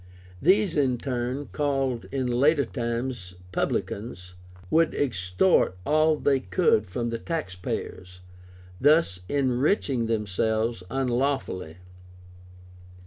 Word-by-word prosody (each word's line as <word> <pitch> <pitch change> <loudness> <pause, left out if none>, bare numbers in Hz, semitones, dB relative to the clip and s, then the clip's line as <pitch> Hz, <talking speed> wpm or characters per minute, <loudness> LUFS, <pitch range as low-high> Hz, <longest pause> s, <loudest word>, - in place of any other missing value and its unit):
These, 190 +2 +3
in 130 -4 +2
turn 125 +2 -3
(called 135 -5 -1
in 135 -1 -1
later 140 +4 +3
times 120 -5 -4 0.2
Publicans), 90 -1 -3 0.4
would 165 0 +3
extort 95 - +2
all 155 +1 +3
they 140 -2 +2
could 95 +1 +2
from 115 +5 -3
the 115 - -3
tax 160 - -3
payers, 90 0 -6 0.6
thus 145 - +4
enriching 135 - +1
themselves 110 0 0
unlawfully. 125 - -1
125 Hz, 95 wpm, -26 LUFS, 110-145 Hz, 0.6 s, thus